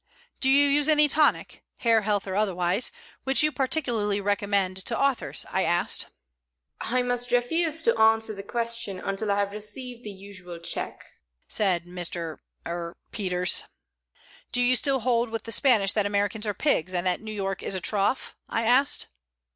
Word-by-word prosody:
"Do 265 Hz, -, +2 dB
you 280 Hz, +2 st, +6 dB
use 290 Hz, +1 st, +3 dB
any 300 Hz, -1 st, +5 dB
tonic 300 Hz, +1 st, +1 dB, 0.2 s
hair, 230 Hz, -2 st, +4 dB
health, 205 Hz, -1 st, 0 dB
or 190 Hz, -1 st, -4 dB
otherwise 190 Hz, +1 st, +1 dB, 0.3 s
which 270 Hz, +2 st, +2 dB
you 305 Hz, -, +3 dB
particularly 245 Hz, -8 st, 0 dB
recommend 200 Hz, -2 st, 0 dB
to 210 Hz, +5 st, -1 dB
authors?" 275 Hz, -2 st, 0 dB
I 190 Hz, -, +1 dB
asked. 175 Hz, 0 st, 0 dB, 0.7 s
"I 250 Hz, +1 st, 0 dB
must 245 Hz, 0 st, 0 dB
refuse 320 Hz, +6 st, +2 dB
to 465 Hz, -, +3 dB
answer 220 Hz, 0 st, +3 dB
that 200 Hz, -1 st, -9 dB
question 235 Hz, -4 st, -3 dB
until 195 Hz, +3 st, -2 dB
I 200 Hz, -, +1 dB
have 200 Hz, 0 st, 0 dB
received 240 Hz, +4 st, -6 dB
the 210 Hz, -, -6 dB
usual 190 Hz, -3 st, -10 dB
check," 170 Hz, -, -5 dB, 0.4 s
said 180 Hz, -5 st, +2 dB
Mr. 175 Hz, -2 st, -3 dB, 0.3 s
er 170 Hz, 0 st, -5 dB
Peters. 180 Hz, -4 st, 0 dB, 0.9 s
"Do 245 Hz, -, 0 dB
you 245 Hz, +1 st, +4 dB
still 270 Hz, 0 st, +1 dB
hold 235 Hz, 0 st, +1 dB
with 225 Hz, -1 st, -4 dB
the 230 Hz, -, -6 dB
Spanish 220 Hz, -5 st, +4 dB
that 210 Hz, -2 st, +1 dB
Americans 205 Hz, +2 st, -1 dB
are 205 Hz, -, -1 dB
pigs, 185 Hz, -, +1 dB
and 175 Hz, +1 st, -1 dB
that 180 Hz, -1 st, 0 dB
New 220 Hz, 0 st, -7 dB
York 195 Hz, -2 st, -3 dB
is -, -, -2 dB
a -, -, -1 dB
trough?" 205 Hz, +7 st, 0 dB
I 225 Hz, -, -1 dB
asked. 255 Hz, +4 st, +3 dB
215 Hz, 170 wpm, -26 LUFS, 195-245 Hz, 0.9 s, you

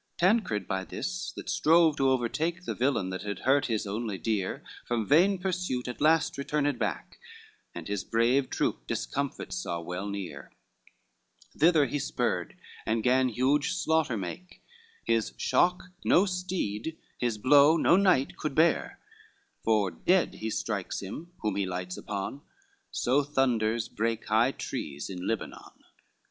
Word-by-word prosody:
XXXVI -, -, -47 dB
Tancred 175 Hz, -, +2 dB
by 95 Hz, 0 st, -1 dB
this, 180 Hz, -, -4 dB
that -, -, -9 dB
strove 160 Hz, -1 st, +4 dB
to 135 Hz, -1 st, +3 dB
overtake 155 Hz, +8 st, -1 dB
The -, -, -2 dB
villain 120 Hz, -7 st, 0 dB
that 95 Hz, -, -4 dB
had 105 Hz, -1 st, -5 dB
hurt 140 Hz, +2 st, +3 dB
his 110 Hz, -3 st, -1 dB
only 105 Hz, 0 st, -3 dB
dear, 100 Hz, +1 st, -2 dB, 0.2 s
From 115 Hz, -2 st, -1 dB
vain 180 Hz, -, +4 dB
pursuit 180 Hz, -9 st, -2 dB
at 125 Hz, -, -6 dB
last 155 Hz, -2 st, +3 dB
returned 145 Hz, 0 st, 0 dB
back, -, -, -3 dB, 0.6 s
And -, -, -7 dB
his 100 Hz, -2 st, -2 dB
brave 120 Hz, +4 st, +2 dB
troop -, -, -2 dB
discomfit 140 Hz, -1 st, -3 dB
saw 85 Hz, -, -3 dB
well 90 Hz, +4 st, -5 dB
near, 95 Hz, -9 st, -6 dB, 1.0 s
Thither 160 Hz, -1 st, +5 dB
he 145 Hz, -, -2 dB
spurred, 135 Hz, -, -2 dB, 0.3 s
and 110 Hz, 0 st, -1 dB
gan 130 Hz, +1 st, +3 dB
huge 140 Hz, +8 st, +1 dB
slaughter 160 Hz, -8 st, +1 dB
make, 100 Hz, -, -7 dB, 0.4 s
His 115 Hz, -1 st, 0 dB
shock 180 Hz, 0 st, +2 dB, 0.2 s
no 185 Hz, -, +5 dB
steed, 180 Hz, -, -3 dB, 0.2 s
his 120 Hz, -3 st, 0 dB
blow 145 Hz, +7 st, +6 dB
no 170 Hz, -, +5 dB
knight 185 Hz, -9 st, +3 dB
could 150 Hz, -3 st, -3 dB
bear, 160 Hz, +1 st, +2 dB, 0.7 s
For 105 Hz, -4 st, +2 dB
dead 180 Hz, -, +2 dB
he 110 Hz, -, -4 dB
strikes 105 Hz, -3 st, -3 dB
him 155 Hz, -, -7 dB
whom 105 Hz, -2 st, 0 dB
he 100 Hz, -2 st, 0 dB
lights 90 Hz, 0 st, -4 dB
upon, 105 Hz, +7 st, -5 dB, 0.5 s
So 130 Hz, +4 st, +2 dB
thunders 120 Hz, -6 st, +1 dB
break 115 Hz, +1 st, -2 dB
high -, -, +3 dB
trees 70 Hz, +5 st, -5 dB
on 90 Hz, -1 st, -5 dB
Lebanon. 115 Hz, -2 st, -4 dB
130 Hz, 150 wpm, -28 LUFS, 105-160 Hz, 1.0 s, blow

